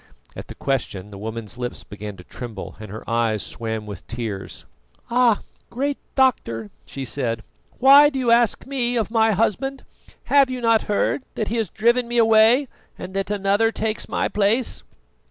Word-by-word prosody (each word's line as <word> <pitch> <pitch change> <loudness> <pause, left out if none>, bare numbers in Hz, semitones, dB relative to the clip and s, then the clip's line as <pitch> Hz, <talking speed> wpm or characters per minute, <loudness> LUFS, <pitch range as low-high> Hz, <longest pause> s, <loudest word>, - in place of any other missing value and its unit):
At - - -8
the - - -10
question 105 -7 -3
the 100 - -9
woman's 110 +2 -6
lips 125 0 -4
began 105 -1 -8
to 90 - -12
tremble, 110 -1 -8
and 110 -1 -9
her 110 +3 -9
eyes 115 -2 0
swam 110 -2 -4
with 100 -4 -9
tears. 110 -5 -5 0.5
"Ah! 240 -3 +4 0.3
great 275 +3 -2 0.2
doctor," 115 - +1 0.2
she 135 -1 -6
said, 115 -4 -2 0.3
"why 280 +3 +8
do 275 - -5
you 250 -3 +1
ask 235 -1 +3
me 245 -3 -1
of 225 -2 -1
my 225 -1 +3
husband? 245 +6 -1 0.4
Have 280 -2 +4
you 255 -1 -3
not 230 -2 +3
heard 210 +6 +1
that 215 - -2
he 235 - -1
has 220 -5 -1
driven 235 +4 +2
me 240 0 -2
away 225 +4 +5 0.3
and 185 +1 -8
that 195 0 -2
another 205 +2 +2
takes 220 -1 -3
my - - 0
place?" 215 +4 0
210 Hz, 170 wpm, -22 LUFS, -, 0.5 s, why